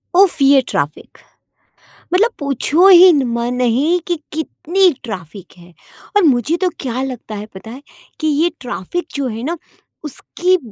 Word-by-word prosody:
उफ्फ 365 -6 +4
ये 275 0 +6
ट्रैफिक। 145 +1 -4 1.0
मतलब 440 +6 +3
पूछो 285 +5 +2
ही 365 -1 +9
न 280 -3 +2
म 235 0 -1
नहीं 255 +8 +1
कि 350 - 0 0.2
कितनी 345 +4 +1
ट्रैफिक 185 -4 -9
है 175 0 -17 0.4
और 410 - +4
मुझे 290 +2 +2
तो 365 - +3
क्या 255 -1 -3
लगता 250 -5 -6
है 205 +1 -6
पता 220 +4 -10
है 260 - -10 0.4
कि, 310 - -1
ये 310 +3 +2
ट्रैफिक 250 - -5
जो 280 -2 -1
है 225 -1 -5
ना, 335 +6 -3 0.5
उसकी 360 +5 -1
280 Hz, 155 wpm, -17 LUFS, 235-345 Hz, 1.0 s, ही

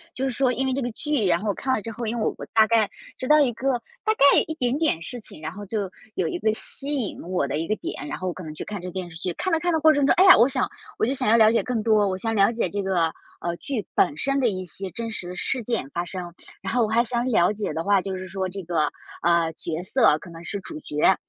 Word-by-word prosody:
就 260 - -3
是 265 - 0
说 255 +1 +2
因 265 +2 -1
为 265 - 0
这 275 - -1
个 245 -1 -2
剧， 295 -2 -1
然 170 -1 +3
后 205 +1 -1
看 260 +6 -1
了 - - -1
之 225 - -5
后， 230 +1 -5
因 230 +2 -2
为 225 - -1
我 - - 0
我 - - -6
大 220 -1 +5
概 220 -2 +2 0.3
知 255 - -5
道 300 +2 +6
一 265 -5 +3
个 255 +2 0 0.2
大 435 - +2
概 280 -8 +6
一 315 - -4
点 250 -3 0
点 305 - +1
事 245 +9 -5
情， 210 - -8
然 155 0 -5
后 205 +4 -9
就 200 -2 -2 0.3
有 - - 0
一 350 - -3
个 220 - +2
吸 280 +6 -1
引 245 -7 -2
我 175 -5 -1
的 140 - -2
一 165 - -3
个 215 - +1
点， 145 - -6
然 - - -4
后 185 - -4
我 180 - -1
可 185 - -9
能 155 - -7
去 - - -6
看 205 -3 -6
这 180 - -6
个 - - -6
电 185 -1 -5
视 160 - -9
剧。 180 - -2
看 370 - -2
的 325 - +3
看 350 +1 0
的 320 - +1
过 315 0 +6
程 290 -1 +1
中， - - +5
唉 370 - +5
呀， 375 - +10
我 240 +4 +5
想 - - 0 0.3
我 - - +2
就 255 - 0
想 260 - 0
要 230 - +6
了 220 -1 +6
解 230 - +2
更 240 -4 -2
多， 215 -2 +3
我 185 -1 -1
想 225 +4 -2
了 200 0 +4
解 235 - -1
这 205 - -3
个， 175 -4 +1 0.3
呃， 170 0 -2
剧 240 -5 -4
本 145 - +2
身 275 +6 +1
的 250 -3 +3
一 185 -2 -4
些 190 +3 -6
真 230 +5 -5
实 210 -5 -4
的 180 - -6
事 255 +7 -1
件 230 - -2
发 175 - -1
生。 175 -1 -6 0.3
然 - - -3
后 245 - +3
我 215 - 0
还 230 +2 +3
想 240 0 -1
了 205 -5 +3
解 210 -4 -3
的 160 +2 -3
话， 200 0 +3
就 190 0 -4
是 185 0 -7
说 190 0 -3
这 195 0 -7
个， 160 -3 +1 0.3
呃， 170 -1 +2
角 160 0 -2
色 190 - +4
可 175 - -12
能 165 0 -10
是 200 +4 -2
主 310 +9 -6
角， 150 - +2
215 Hz, 330 characters per minute, -24 LUFS, 180-250 Hz, 0.3 s, 呀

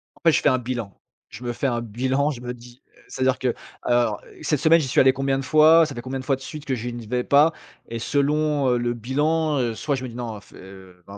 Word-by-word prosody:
En - - -23
fait, 165 - +5
je - - +2
fais - - +4
un 130 - +2
bilan. 120 -5 -5 0.4
Je 125 - -11
me 120 0 -3
fais 135 - -1
un 120 -2 -1
bilan. 130 +6 -1
Je 120 -3 -8
me 125 0 -5
dis, 120 +1 -15 0.2
heu, - - -21
c'est-à-dire 130 -1 0
que 125 -2 0 0.3
«Alors, 120 -4 +1
heu - - -17
cette 150 -2 0
semaine, 165 +1 +5
j'y 140 - -2
suis - - +1
allé 130 0 +6
combien 135 0 0
de - - -4
fois? 155 +3 +6
Ça 145 - -6
fait 120 - -5
combien 130 +1 -5
de 130 - -8
fois 135 - +2
de 135 - -15
suite 150 +1 -8
que 130 - -1
je 120 +1 -5
n'y 120 -2 -7
vais 125 +1 -1
pas?» 150 +3 +4 0.4
et 115 0 -4
selon, 145 +1 +1
heu, 125 - +2
le 120 0 -1
bilan, 150 +6 0
heu, 115 -3 -1
soit 145 +3 -1
je 130 - -6
me 125 - -5
dis: 115 - -11
«Non, 120 -3 -5
heu, - - -10
fais, - - -17
heu, 95 -2 -14
130 Hz, 285 wpm, -23 LUFS, 120-145 Hz, 0.4 s, allé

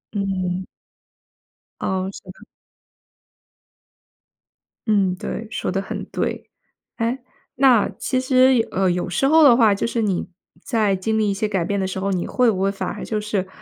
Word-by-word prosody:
嗯。 185 -2 -2 1.2
哦， 190 0 -1
是 - - -11
的。 - - -17 2.4
嗯， 195 -4 +2
对， 220 +4 -5
说 - - -3
得 195 +1 -1
很 195 - -5
对。 - - -4 0.5
诶， 235 +3 -1 0.4
那 255 -5 +4
其 260 - -1
实 255 -2 +4
呃， 190 -1 +1
有 175 0 -2
时 180 +10 +1
候 320 +2 +6
的 265 -5 +8
话， 225 -4 +5
就 200 - -1
是 235 0 -1
你 195 -5 -1 0.3
在 210 -3 +1
经 220 +4 -1
历 215 -1 +2
一 - - 0
些 210 +2 -1
改 195 -4 -1
变 200 +4 -1
的 190 - -1
时 190 0 -4
候， 195 +1 -1
你 180 -2 -1
会 250 -2 +3
不 190 -3 -3
会 195 - +2
反 195 - -4
而 - - -6
就 215 -1 -2
是， 210 -3 -2
205 Hz, 180 characters per minute, -21 LUFS, 190-230 Hz, 2.4 s, 的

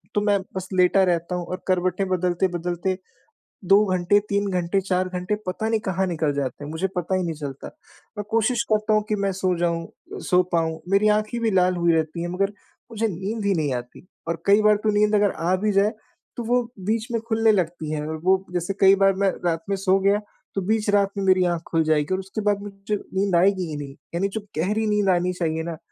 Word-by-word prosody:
तो 205 - +3
मैं 205 -1 +2 0.2
बस 190 -1 -4
लेटा 185 +1 +4
रहता 175 -1 0
हूँ 175 -1 -3
और 185 +1 -6
करवटें 185 +1 +1
बदलते-बदलते 180 0 -1 0.7
2 195 +3 +6
घंटे, 185 +3 +3
3 200 0 0
घंटे, 180 +1 0
4 185 -1 0
घंटे 180 +3 -2
पता 185 +4 -2
नहीं 225 -1 +1
कहाँ 190 0 0
निकल 160 -4 0
जाते 140 0 -3
हैं 145 - -6
मुझे 160 +4 -1
पता 180 +1 -1
ही 185 - 0
नहीं 170 -2 -2
चलता। 140 -3 -7 0.5
मैं 210 - -2
कोशिश 230 +2 +1
करता 215 0 +2
हूँ 215 0 +3
कि 215 - +2
मैं 200 -1 0
सो 185 -1 0
जाऊँ 170 -1 0
अ, - - -12
सो 180 0 +3
पाऊँ 160 -2 0
मेरी 200 +2 +3
आँखें 215 +2 -3
भी 225 -1 +1
लाल 185 -1 +3
हुई 170 -1 +2
रहती 160 +1 -1
हैं 175 - -3
मगर 195 +2 0 0.4
मुझे 225 0 0
नींद 200 +3 -4
ही 200 - +3
नहीं 150 -5 0
आती। 125 +7 -7 0.2
और 170 0 -3
कई 200 +2 +5
बार 210 0 +5
तो 220 - +2
नींद 210 0 +3
अगर 205 -1 +3
आ 175 +3 0
भी 210 +3 0
जाए 200 +2 +3 0.5
तो 240 - -3
वो 245 +2 +2 0.2
बीच 220 +2 0
में 230 - 0
खुलने 225 -1 +3
लगती 170 -5 -1
है 150 -1 -2
और 160 0 -4
वो 190 +1 +3
जैसे 175 +2 -1
कई 195 0 +7
बार 195 0 +5
मैं 195 - +4 0.2
रात 165 -1 0
में 200 - +1
सो 190 0 +2
गया 200 +2 +3 0.4
तो 195 - 0
बीच 215 +2 0
रात 200 -1 +3
में 200 - -1
मेरी 185 -1 +4
आँख 170 - -4
खुल 165 -1 +1
जाएगी 155 +1 +1
और 185 - 0
उसके 195 +3 -5
बाद 205 -1 +1
मुझे 200 +1 -4
नींद 195 -1 -1
आएगी 185 +1 +3
ही 155 - -4
नहीं। 140 -2 -7 0.2
यानी 190 +3 +1
जो 220 - -2 0.2
गहरी 210 +7 0
नींद 210 -2 +2
आनी 180 0 +2
चाहिए 160 -2 -2
ना 165 -1 -5
185 Hz, 230 wpm, -23 LUFS, 170-205 Hz, 0.7 s, कई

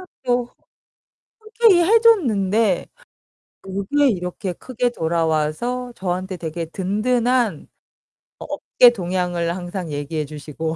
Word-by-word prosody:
그냥 370 - -11 0.2
뭐 245 0 0 0.8
흔쾌히 435 -5 +3
해줬는데 230 - +3 0.8
요게 200 +10 +1
이렇게 180 -1 -3
크게 245 +6 -2
돌아와서 165 +8 -1
저한테 185 0 -3
되게 165 0 -4
든든한 230 +6 0 0.7
업계 245 - +4
동향을 175 -4 -2
항상 175 -2 -5
얘기해 145 +2 -3
주시고. 155 +2 -5
190 Hz, 235 characters per minute, -21 LUFS, 170-245 Hz, 0.8 s, 업계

